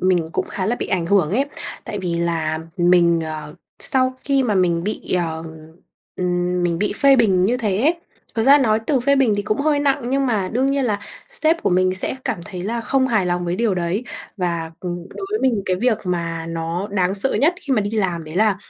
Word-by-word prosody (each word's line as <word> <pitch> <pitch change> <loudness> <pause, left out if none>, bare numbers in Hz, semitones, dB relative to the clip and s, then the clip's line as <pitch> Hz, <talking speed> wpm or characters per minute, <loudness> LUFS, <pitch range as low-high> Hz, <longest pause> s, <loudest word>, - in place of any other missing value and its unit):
mình 180 -3 +2
cũng - - -1
khá 185 - -3
là 235 +3 0
bị - - -3
ảnh 175 -3 -1
hưởng 180 -5 +3
ấy. 250 +8 +2 0.4
Tại 205 - -5
vì 180 -3 -2
là 165 -2 -1 0.2
mình, 175 -1 +4
ờ, 155 -1 -6 0.2
sau 255 -1 +1
khi 275 -1 +2
mà 225 -5 0
mình 175 -3 +2
bị, 210 - -3
ờ 165 -3 -1 0.7
ừm, 180 0 0
mình 170 -1 0
bị 210 +2 0
phê 275 -1 +5
bình 195 -7 +3
như 245 +4 +1
thế 210 -5 -1
ấy, 310 +7 +3 0.4
thực 225 - +1
ra 280 +5 +7
nói 220 -5 +2
từ 275 -4 +2
phê 280 +3 +3
bình 255 -6 +3
thì 205 - -1
cũng 210 +1 -1
hơi 295 0 +2
nặng 285 -1 +1
nhưng 275 0 +1
mà 205 -6 0
đương 260 +4 +2
nhiên 275 -1 +1
là 210 -4 0 0.3
sếp 335 -9 0
của - - +1
mình 185 +1 +2
sẽ 185 +7 -3
cảm - - -2
thấy 185 -4 -7
là 230 +5 -2
không 260 +3 +1
hài 215 -7 +1
lòng 175 0 -1
với 175 +1 -1
điều 225 -3 +1
đấy. 180 +6 -1 0.3
Và, 170 -4 -2
ừm, 175 -1 -5
đối 390 - -7
với 430 - 0
mình 235 -6 +1
cái 185 - +1
việc 230 +2 +1
mà 170 -2 -2
nó 165 +3 -3
đáng 190 -1 +1
sợ 205 +7 0
nhất 320 +6 +3
khi 280 - -2
mà 235 - +3
đi 205 0 -2
làm 185 -7 -1
đấy 155 +2 -8
là 210 -1 +3
195 Hz, 235 wpm, -21 LUFS, 175-250 Hz, 0.7 s, ra